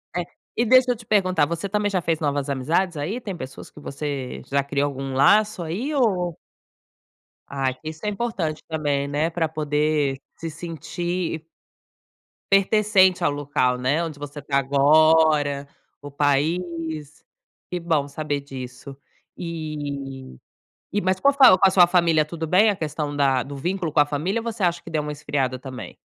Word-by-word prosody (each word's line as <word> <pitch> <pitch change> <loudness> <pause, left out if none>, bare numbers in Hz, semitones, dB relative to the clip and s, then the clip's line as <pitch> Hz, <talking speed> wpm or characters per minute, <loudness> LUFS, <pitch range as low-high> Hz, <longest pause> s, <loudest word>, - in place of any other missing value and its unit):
É, 175 -1 -1 0.3
e 235 - +2
deixa 255 +1 +5
eu - - 0
te 225 0 -14
perguntar, 185 -7 +3
você 170 +4 -3
também 205 +1 0
já 190 -2 0
fez 165 -1 0
novas 145 -2 -1
amizades 160 +6 0
aí? 185 +12 -3
Tem 200 -6 -6
pessoas 135 -5 -9
que - - -14
você 140 -3 -5
já 140 0 0
criou 140 0 0
algum 135 -1 -5
laço 205 +7 +4
aí 220 - -3
ou 180 - +1 1.1
Ai, 135 -2 -1
que 155 +4 -8
isso 160 +5 -9
é - - +1
importante 195 -8 -3
também, 145 -3 -1
né, 150 +3 0
pra 165 -2 -1
poder 150 -2 0 0.2
se 165 - -5
sentir 165 +1 -4 1.1
pertencente 195 -2 +4
ao 145 - +3
local, 135 -3 0
né, 145 +7 +1
onde 155 -3 -6
você 145 0 -7
tá 140 -1 -1
agora, 145 +1 +4 0.3
o 145 -1 -10
país. 155 +1 -1 0.4
Que 180 - -3
bom 160 -4 0
saber 145 0 -3
disso. 135 0 -9 0.4
E 145 - -6 0.5
e 205 +1 0
mas 185 0 0
qual 280 +5 +4
foi 270 -2 +8
com 195 - +5
a - - +4
sua 175 -2 +6
família, 170 -3 +3
tudo 165 +1 -5
bem 200 +6 +5
a 200 - +1
questão 150 -3 -3
da 135 -3 +2
do 140 +1 -8
vínculo 175 +3 -2
com 150 - +2
a 145 - +6
família 160 +10 -1
ou - - -10
você 230 -2 -5
acha 170 -1 +1
que - - -10
deu 155 -1 0
uma 150 0 -4
esfriada 135 -3 -2
também? 130 -1 -9
155 Hz, 170 wpm, -23 LUFS, 140-180 Hz, 1.1 s, foi